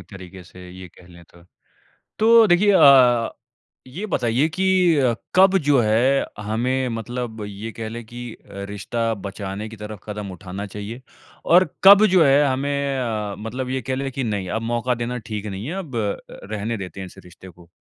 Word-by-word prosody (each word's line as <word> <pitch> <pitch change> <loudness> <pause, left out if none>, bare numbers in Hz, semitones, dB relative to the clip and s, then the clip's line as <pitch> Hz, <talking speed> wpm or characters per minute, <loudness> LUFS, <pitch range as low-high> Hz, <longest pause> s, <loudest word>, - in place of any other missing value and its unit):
एक - - -15
तरीक़े 95 -1 -11
से 90 +1 -13
ये 90 0 -11
कह 90 +1 -19
लें 85 -1 -15
तो। 85 +1 -21 0.8
तो 225 0 +6
देखिए 195 +3 +4
अ, 130 - +6 0.6
ये 175 +12 -6
बताइए 125 - 0
कि 190 - 0 0.7
कब 190 +1 +6
जो 140 -3 +5
है, 120 +6 +2
हमें 125 +5 -1
मतलब 115 -2 -5
ये 105 +3 -7
कह 110 0 -6
लें 115 +1 -7
कि 120 +1 -8
अ, - - -16 0.4
रिश्ता 115 +3 -2
बचाने 100 +2 -6
के 110 - -10
तरफ़ 105 -1 -8
कदम 105 -2 -6
उठाना 95 +2 -7
चाहिए 105 +5 -7 0.4
और 175 0 +5
कब 200 +2 +9
जो 185 -4 +4
है 140 +1 +5
हमें 140 +1 -1
अ, 110 -5 -3
मतलब 125 +4 -5
ये 130 0 -2
कह 130 +2 -3
लें 135 0 -3
कि 135 0 -3
नहीं 100 -5 -3
अब - - -10
मौका 125 +1 0
देना 125 +1 -3
ठीक 105 -1 -4
नहीं 100 0 -6
है 170 - -4
अब 140 -7 -10
अ, 105 -3 -4
रहने 110 +2 -3
देते 95 0 -8
हैं 95 - -5
इस - - -16
रिश्ते 90 +1 -14
को? 85 -1 -18
115 Hz, 190 wpm, -22 LUFS, 100-135 Hz, 0.8 s, कब